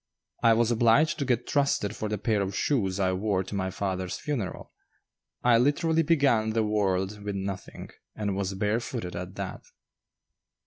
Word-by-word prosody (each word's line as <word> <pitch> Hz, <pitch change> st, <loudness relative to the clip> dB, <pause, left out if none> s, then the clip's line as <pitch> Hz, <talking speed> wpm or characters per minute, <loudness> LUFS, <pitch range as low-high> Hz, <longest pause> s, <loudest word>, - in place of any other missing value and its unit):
I 115 Hz, -1 st, +6 dB
was 120 Hz, +1 st, +2 dB
obliged 120 Hz, +8 st, +3 dB
to 140 Hz, -, 0 dB
get 125 Hz, -2 st, 0 dB
trusted 140 Hz, -7 st, +1 dB
for 110 Hz, 0 st, -3 dB
the 105 Hz, -, -1 dB
pair 105 Hz, 0 st, 0 dB
of 100 Hz, 0 st, -3 dB
shoes 100 Hz, -9 st, 0 dB
I 95 Hz, -1 st, +2 dB
wore 95 Hz, 0 st, 0 dB
to 95 Hz, -, -9 dB
my 95 Hz, -1 st, -1 dB
father's 95 Hz, -1 st, -3 dB
funeral. 120 Hz, -11 st, -4 dB, 0.7 s
I 120 Hz, -2 st, +5 dB
literally 160 Hz, +5 st, +2 dB
began 140 Hz, -9 st, +2 dB
the 110 Hz, 0 st, +2 dB
world 100 Hz, -1 st, 0 dB
with 100 Hz, -1 st, -4 dB
nothing, 95 Hz, 0 st, -6 dB, 0.2 s
and 100 Hz, -2 st, -2 dB
was 95 Hz, 0 st, -2 dB
barefooted 105 Hz, -1 st, -2 dB
at 90 Hz, +1 st, -6 dB
that. 100 Hz, -2 st, -5 dB
105 Hz, 165 wpm, -27 LUFS, 95-120 Hz, 0.7 s, I